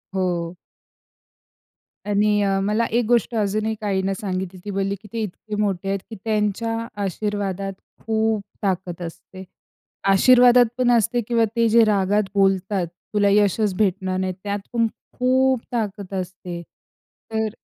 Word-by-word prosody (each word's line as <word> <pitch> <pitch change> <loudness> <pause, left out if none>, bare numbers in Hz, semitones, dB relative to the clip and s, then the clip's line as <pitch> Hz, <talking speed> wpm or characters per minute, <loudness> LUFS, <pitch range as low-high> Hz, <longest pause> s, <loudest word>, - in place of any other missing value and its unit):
हो. 175 -2 -1 1.5
आणि 205 0 +2
अ, 195 -1 +1
मला 210 +3 +1
एक 240 - +2
गोष्ट 235 +1 +2
अजून 215 0 0
एक 220 -1 -3
आईनं 195 -1 0
सांगितली. 185 -3 -4
ती 205 - -3
बोलली 195 0 -1
की 215 - -13
ते 230 - -2
इतके 210 +2 -6
मोठे 195 -2 -1
आहेत, 195 0 0
की 225 - -7
त्यांच्या 220 +1 0 0.3
आशीर्वादात 195 0 -2 0.3
खूप 220 -1 +1 0.2
ताकद 185 -3 -2
असते. 185 +3 -10 0.7
आशीर्वादात 245 +4 +7
पण 250 -1 +3
असते 235 +1 +2
किंवा 230 -1 +3
ते 230 -1 +3
जे 230 +1 +6
रागात 205 -1 +2
बोलतात, 195 -1 +2 0.3
"तुला 205 -1 +3
यशच 205 0 +3
भेटणार 190 -2 0
नाही," 185 0 -1
त्यात 205 0 -2
पण 230 -1 +3 0.3
खूप 260 0 +3
ताकद 205 -4 -3
असते. 180 -1 -6 0.7
तर 220 0 0
205 Hz, 140 wpm, -22 LUFS, 190-225 Hz, 1.5 s, आशीर्वादात